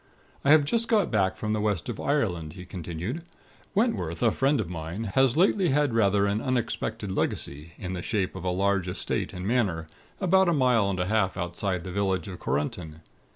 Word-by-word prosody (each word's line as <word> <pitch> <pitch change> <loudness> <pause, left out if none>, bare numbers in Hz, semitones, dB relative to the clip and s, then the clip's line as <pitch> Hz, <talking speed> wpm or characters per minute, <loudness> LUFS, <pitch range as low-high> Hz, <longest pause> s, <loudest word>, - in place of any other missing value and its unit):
"I 140 - +2
have 150 -1 +7
just 230 +9 +1
got 210 -5 +2
back 95 -4 +1
from 105 0 -2
the 110 - 0
West 105 -5 0
of 120 -4 -4
Ireland," 90 - 0
he 90 0 -9
continued. 90 - -5 0.5
"Wentworth, 190 - 0
a - - +5
friend 135 +2 +2
of 105 - -1
mine, 85 +4 -5
has 130 0 +3
lately 190 0 +4
had 145 -2 +2
rather 100 -3 +3
an 100 +2 0
unexpected 115 -4 -2
legacy, 75 -3 -2
in 95 -2 -5
the 90 - -3
shape 95 -1 -1
of 95 - -6
a 90 - 0
large 95 0 +1
estate 90 - -2
and 90 +1 -5
manor, 100 -9 +1 0.3
about 190 -1 +4
a - - +3
mile 125 -8 +3
and 95 -2 -2
a 90 - +1
half 100 -2 +1
outside 90 +2 -2
of 90 - -5
the 95 - -6
village 95 +1 0
of 90 -2 -7
Korunton. 75 +2 -3
100 Hz, 200 wpm, -27 LUFS, 90-130 Hz, 0.5 s, have